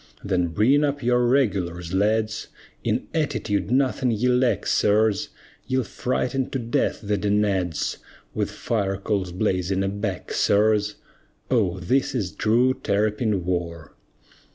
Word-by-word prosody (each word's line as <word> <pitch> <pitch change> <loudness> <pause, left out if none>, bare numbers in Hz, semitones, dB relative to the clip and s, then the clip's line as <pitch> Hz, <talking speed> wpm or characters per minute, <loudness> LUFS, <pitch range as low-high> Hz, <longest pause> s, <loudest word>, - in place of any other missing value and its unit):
Then 90 -3 +1
bring 115 - +3
up 140 -2 -1
your 120 0 +3
"regulars," 90 -9 0
lads, 105 +2 0 0.4
In - - -1
"attitude" 110 -11 -1
nothing 130 0 +1
ye 115 +2 +1
lack, 125 -4 +2
sirs, 105 0 +2 0.4
Ye'll 130 0 +1
frighten 130 +3 -2
to - - -2
death 120 -2 -1
the 105 0 0
Danads, 100 -5 0 0.4
With - - -1
fire 100 -4 -2
coals 95 -2 -2
blazing 95 0 0
aback, 100 -1 -3
sirs! 105 0 +2 0.6
Oh, 95 -7 +1
this 130 +10 0
is 100 -7 -1
true 120 +5 +2
Terrapin 105 -3 0
war! 85 -4 -3
105 Hz, 125 wpm, -24 LUFS, 95-125 Hz, 0.6 s, bring